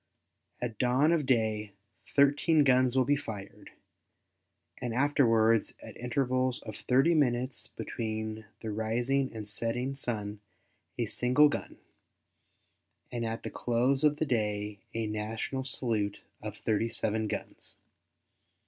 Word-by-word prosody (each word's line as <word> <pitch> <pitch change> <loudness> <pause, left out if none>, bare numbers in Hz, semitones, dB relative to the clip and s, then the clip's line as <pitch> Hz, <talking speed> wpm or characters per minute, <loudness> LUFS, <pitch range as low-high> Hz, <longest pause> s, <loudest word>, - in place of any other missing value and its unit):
At 120 -4 -4
dawn 130 +5 +3
of 155 -5 +1
day 110 -4 +1 0.3
thirteen 145 +2 +4
guns 130 -2 +4
will 130 -1 +4
be 145 +3 +3
fired, 105 -8 -7 1.1
and 120 -2 -2
afterwards 115 -5 +3
at - - -11
intervals 130 +1 0
of 110 -2 -7
thirty 135 +10 +3
minutes 130 -4 +1
between 110 -1 -4 0.2
the 110 - -4
rising 120 +5 0
and 110 -2 -7
setting 120 +6 -1
sun 105 -6 -3 0.6
a - - +1
single 125 +5 +4
gun, - - -5 1.3
and 120 -1 -2
at 115 0 -3
the - - -5
close 125 +4 +1
of 150 -1 +5
the 155 - 0
day 105 -5 -1 0.2
a 115 -1 0
national 110 +5 -3
salute 110 -6 -1 0.2
of 105 0 -6
thirty 115 +1 0
seven 110 0 -1
guns. - - -6
120 Hz, 125 wpm, -30 LUFS, 110-130 Hz, 1.3 s, of